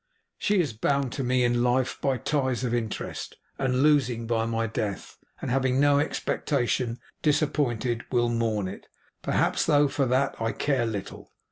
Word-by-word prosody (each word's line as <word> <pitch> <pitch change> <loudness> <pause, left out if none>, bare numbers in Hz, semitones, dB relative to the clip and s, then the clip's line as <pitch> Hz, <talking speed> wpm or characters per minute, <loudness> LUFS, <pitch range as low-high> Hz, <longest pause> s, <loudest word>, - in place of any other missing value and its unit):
She 205 -2 +2
is 150 -9 0
bound 140 +4 0
to 135 - -3
me 125 0 +2
in 120 0 +2
life 125 +1 +1
by 135 -2 +1
ties 130 -1 -1
of 120 -2 -1
interest, 115 -3 -3 0.2
and 130 0 +1
losing 130 -6 +3
by 115 -1 0
my 115 0 0
death, 105 -3 -4 0.2
and - - -4
having 130 0 +2
no 145 0 +5
expectation 125 -5 -1 0.2
disappointed, 135 -6 0
will 120 -2 +2
mourn 115 -4 0
it, 95 - -9 0.3
perhaps; - - +1
though 145 -2 +5
for 135 -1 0
that 130 0 0
I 115 0 0
care 135 -5 0
little. 105 -4 -6
125 Hz, 160 wpm, -26 LUFS, 115-140 Hz, 0.3 s, no